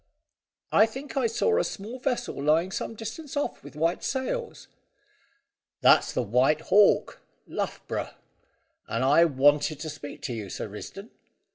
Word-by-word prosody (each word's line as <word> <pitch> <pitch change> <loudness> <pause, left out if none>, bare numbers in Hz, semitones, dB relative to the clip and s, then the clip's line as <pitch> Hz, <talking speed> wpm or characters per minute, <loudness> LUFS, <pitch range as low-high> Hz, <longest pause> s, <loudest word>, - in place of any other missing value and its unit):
"I 215 - +6
think 265 +6 -8
I 265 -4 +2
saw 445 - +1
a - - +2
small 220 +6 -6
vessel 250 - -2
lying 160 +5 +2
some 225 - -4
distance 265 +8 -7
off, 290 - -2
with - - -12
white 165 +3 0
sails." 460 - -3 1.1
"That's - - +5
the 125 - -1
White 125 +8 +2
Hawk, 205 +1 +4 0.2
Luff - - -4
Brough. - - -4 0.7
And 115 - -1
I 150 +5 +6
wanted 145 0 +3
to 155 0 -5
speak 145 -1 -9
to 125 - -3
you, 105 -4 -6
Sir - - -5
Risdon." 195 - -9
170 Hz, 150 wpm, -27 LUFS, -, 1.1 s, I